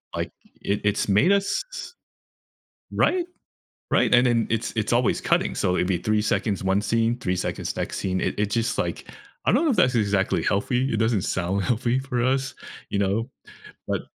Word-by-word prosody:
like, - - -3 0.3
it 100 +1 -1
it's 105 0 +1
made 105 - +4
us 200 - 0
s 475 - -7 1.0
Right? 360 -2 +2 0.7
Right, - - +4
and 125 +1 +5
then 115 -2 +2
it's 115 0 -1
it's 110 +2 0
always 120 -1 +2
cutting, - - +1
so 90 - +1
it'd 90 - +1
be 90 -3 +1
3 110 0 +1
seconds 100 -3 0
one 95 +2 +2
scene, 115 +2 +1
3 90 -4 -1
seconds - - -3
next - - -3
scene, 95 -1 -1
it - - -1
it 105 - +2
just 115 +1 0
like - - -3 0.4
I - - +4
don't 335 - +3
know 300 - +3
if - - 0
that's 125 -1 +4
exactly 100 -5 +1
healthy, 125 +6 0
it - - 0
doesn't 110 -3 +1
sound 95 +2 -1
healthy 120 +2 +1
for 125 -3 -2
us, 135 +1 0 0.3
you 100 - -1
know, 105 +5 0 0.6
but - - -1
115 Hz, 190 wpm, -24 LUFS, 100-125 Hz, 1.0 s, and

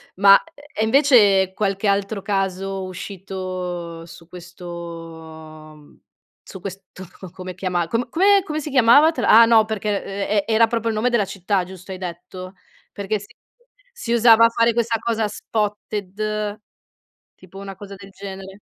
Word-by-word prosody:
Ma 195 +1 +7
e 290 -7 -6
invece 220 -7 +4
qualche 200 0 -1
altro 200 +1 0
caso 195 -1 -2
uscito 185 -3 -6
su 170 0 -14
questo 165 -3 -11 0.5
su 190 - -11
questo 190 0 -9 0.3
come 185 0 -8
chiamarlo, 180 -2 -2
co 235 +1 -2
come 395 +5 +4
come 310 -4 -4
si 305 - -6
chiamava 270 +5 +6
te 260 - -5
l'ha 230 -1 +7
ah, - - +8
no 225 -1 +5
perché 210 -2 -2
ehm 195 +1 -6
ehm 205 0 0
e 225 - 0
era 225 +1 +5
proprio 230 0 -2
il - - -4
nome 245 +3 +1
della 235 -4 +1
città, 190 0 -1
giusto, 185 +1 -11
hai 185 - -5
detto? 185 +1 -8 0.4
Perché 205 +1 -3
si 200 - -13 0.7
si 245 - -4
usava 230 -1 +6
fare 230 0 +2
questa 230 -1 0
cosa 225 -2 -1
spotted 210 0 -4 0.8
tipo, 185 +1 -16
una 195 -1 -8
cosa 200 +1 -11
del 195 +1 -13
genere. 195 0 -10
200 Hz, 155 wpm, -21 LUFS, 185-225 Hz, 0.8 s, ah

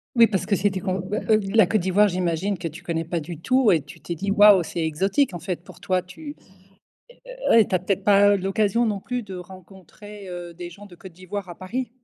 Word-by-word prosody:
Oui, 235 - +7
parce 190 -5 -2
que 200 - +2
c'était 190 +1 0
com 185 -1 -3 0.3
heu, 215 0 +5
la 220 -5 +5
Côte 210 -2 +1
d'Ivoire 195 +3 +3
j'imagine 180 +1 -1
que 170 - -4
tu 165 +4 -10
connais 165 -1 -3
pas 170 +1 -2
du 160 +1 -8
tout 255 +3 +3
et 160 -4 +3
tu 150 +4 -14
t'es 170 +3 -5
dit: 200 +4 -3
«Waouh, 205 -3 +6
c'est 170 - -6
exotique», 195 - 0
en 175 - -5
fait 175 0 -5
pour - - -15
toi, 185 -1 0
tu 290 - -10 1.2
ouais, 225 -2 +7
tu - - -3
as - - +4
peut-être 190 +2 -2
pas 205 -1 +5
l'occasion 200 +4 0
non 205 -2 -2
plus 250 +4 -4
de 195 -3 -9
rencontrer, 190 +2 -12
heu, 175 -1 -7
des 175 0 -8
gens 205 +4 -13
de 180 - -15
Côte 175 +1 -13
d'Ivoire 185 +2 -7
à 175 - -8
Paris? 230 +6 -4
190 Hz, 230 wpm, -23 LUFS, 175-205 Hz, 1.2 s, Oui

